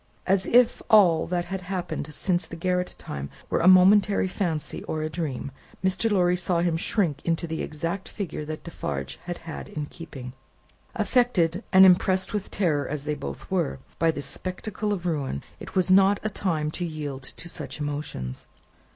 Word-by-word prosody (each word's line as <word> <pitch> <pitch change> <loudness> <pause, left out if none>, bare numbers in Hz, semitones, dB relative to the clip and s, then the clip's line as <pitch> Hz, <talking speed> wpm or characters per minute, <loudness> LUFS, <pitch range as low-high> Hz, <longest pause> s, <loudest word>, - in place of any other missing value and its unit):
As 190 0 +2
if 245 0 +4
all 180 -7 +6
that 175 0 -1
had 190 +1 -4
happened 180 -5 -4
since 175 +3 0
the - - -8
garret 180 +1 -1
time 70 0 -6 0.2
were - - +2
a 170 - +3
momentary 195 +2 +6
fancy, 175 -5 -3
or 155 -1 -2
a 155 - -3
dream, 150 -5 -3 0.3
Mr. 190 +4 +2
Lorry 180 -3 +3
saw 175 -1 0
him 170 -2 +1
shrink 165 -4 0
into 170 0 0
the 160 -1 -3
exact 170 +5 -4
figure 170 -6 -5
that 155 0 -6
Defarge 70 - -5
had 175 -1 -4
had 160 -2 -8
in 150 -1 -4
keeping. 140 -6 -9 0.6
Affected, 210 -5 +2
and 190 0 +9
impressed 185 +1 +4
with 210 -2 -2
terror 155 -8 0
as 145 -1 -4
they 150 +1 -1
both 145 +4 -7
were, 175 -8 0 0.2
by 165 - +4
this 145 -4 -1
spectacle 185 +7 -3
of 185 -4 -2
ruin, 140 - -2 0.2
it - - -10
was 185 0 +3
not 195 +1 +6
a 215 - 0
time 160 -7 -1
to 175 - -4
yield 150 -5 -4
to 150 +6 -5
such 170 - -6
emotions. 145 - -5
175 Hz, 175 wpm, -26 LUFS, 150-190 Hz, 0.6 s, and